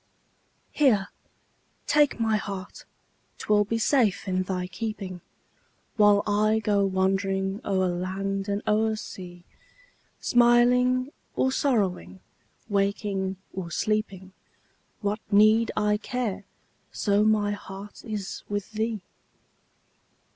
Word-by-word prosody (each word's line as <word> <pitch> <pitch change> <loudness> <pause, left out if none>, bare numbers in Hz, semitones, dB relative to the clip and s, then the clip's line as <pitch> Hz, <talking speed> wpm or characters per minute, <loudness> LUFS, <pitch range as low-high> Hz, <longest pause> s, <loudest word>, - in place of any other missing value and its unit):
Here, 220 -10 +3 0.8
take 295 -4 +3
my 220 -1 +2
heart 195 -3 -7 0.5
'twill 210 -1 +2
be 230 +3 -1
safe 225 -5 +2
in 185 0 0
thy 185 -1 -2
keeping, 195 -3 -5 0.7
While 205 -1 +5
I 215 +1 +2
go 205 -2 +1
wandering 195 +1 0
o'er 190 -2 +1
land 195 +3 -3
and 200 +1 -1
o'er 220 +1 +2
sea; 180 -4 -9 0.8
Smiling 250 +2 +4 0.2
or 260 - +2
sorrowing, 190 - 0 0.5
waking 200 -1 -1 0.2
or 185 -3 -5
sleeping, 195 -1 -2 0.7
What 205 +1 -1
need 215 +2 +5
I 210 0 +2
care, 225 -4 -3 0.5
so 205 0 +1
my 215 -1 +2
heart 200 0 -8
is 210 -4 -5
with 205 +1 -3
thee? 220 -2 -2
205 Hz, 105 wpm, -26 LUFS, 195-220 Hz, 0.8 s, While